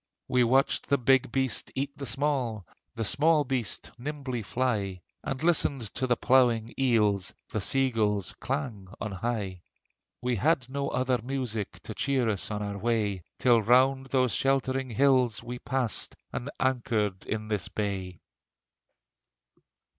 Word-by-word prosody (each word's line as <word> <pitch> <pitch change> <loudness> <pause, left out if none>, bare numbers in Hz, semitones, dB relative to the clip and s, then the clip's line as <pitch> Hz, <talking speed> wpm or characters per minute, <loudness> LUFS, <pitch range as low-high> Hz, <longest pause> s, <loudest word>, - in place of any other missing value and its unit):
We 125 -1 +3
watched 130 +3 +2
the 140 - +4
big 130 -1 +3
beast 130 -1 0
eat 140 +1 -2
the 140 -2 -6
small, 125 -7 0 0.3
The 115 -1 -2
small 150 +6 +3
beast 125 -5 -2
nimbly 135 -3 -4
fly, 105 -6 -1 0.2
And 135 0 -3
listened 140 -9 +1
to 130 - -1
the 120 - +3
plunging 120 -3 +3
eels, 105 -8 +2 0.2
The 110 - -1
sea 135 +5 +2
gull's 105 -4 0
clang 125 -8 -3
on 105 - -3
high. 95 -2 -3 0.6
We 125 -1 -1
had 135 - +2
no 140 +1 -2
other 130 -1 +1
music 120 -5 -3
To - - -6
cheer 135 -4 +1
us 100 -3 -2
on 105 -1 -3
our 100 0 -4
way: 105 -4 0 0.2
Till 120 -3 +4
round 130 +4 +4
those 130 -3 +2
sheltering 135 -1 +1
hills 130 -1 +3
we 120 +1 -6
passed 125 -5 -2 0.2
And 125 - -4
anchored 115 -7 0
in 110 0 -3
this 105 -5 0
bay. 95 -4 -4
125 Hz, 145 wpm, -28 LUFS, 105-135 Hz, 0.6 s, the